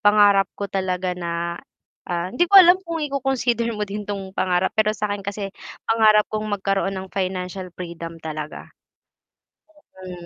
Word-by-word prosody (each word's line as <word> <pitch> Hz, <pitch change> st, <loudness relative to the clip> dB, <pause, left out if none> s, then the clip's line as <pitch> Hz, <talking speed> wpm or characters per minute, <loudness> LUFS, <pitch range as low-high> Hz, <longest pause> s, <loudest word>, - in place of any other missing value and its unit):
pangarap 205 Hz, -2 st, +5 dB
ko 200 Hz, -, -3 dB
talaga 185 Hz, -1 st, -2 dB
na, 170 Hz, -1 st, -4 dB, 0.5 s
ah 175 Hz, +1 st, -2 dB
hindi 345 Hz, +7 st, +2 dB
ko 400 Hz, -, +6 dB
alam 365 Hz, 0 st, +9 dB
kung 335 Hz, -3 st, -5 dB
i-coconsider 260 Hz, -4 st, 0 dB
mo 210 Hz, -, -1 dB
din 205 Hz, +1 st, -6 dB
'tong 195 Hz, -2 st, -5 dB
pangarap, 185 Hz, -1 st, +1 dB
pero 215 Hz, -1 st, +1 dB
sa 210 Hz, -, -3 dB
akin 205 Hz, -, -4 dB
kasi 200 Hz, 0 st, -5 dB, 0.3 s
pangarap 215 Hz, -2 st, +5 dB
kong 215 Hz, 0 st, -2 dB
magkaroon 195 Hz, -1 st, -1 dB
ng 190 Hz, 0 st, -7 dB
financial 185 Hz, -1 st, -3 dB
freedom 170 Hz, -2 st, -7 dB
talaga. 155 Hz, -1 st, -6 dB, 1.3 s
Mm. 180 Hz, -2 st, -9 dB
195 Hz, 150 wpm, -22 LUFS, 180-215 Hz, 1.3 s, alam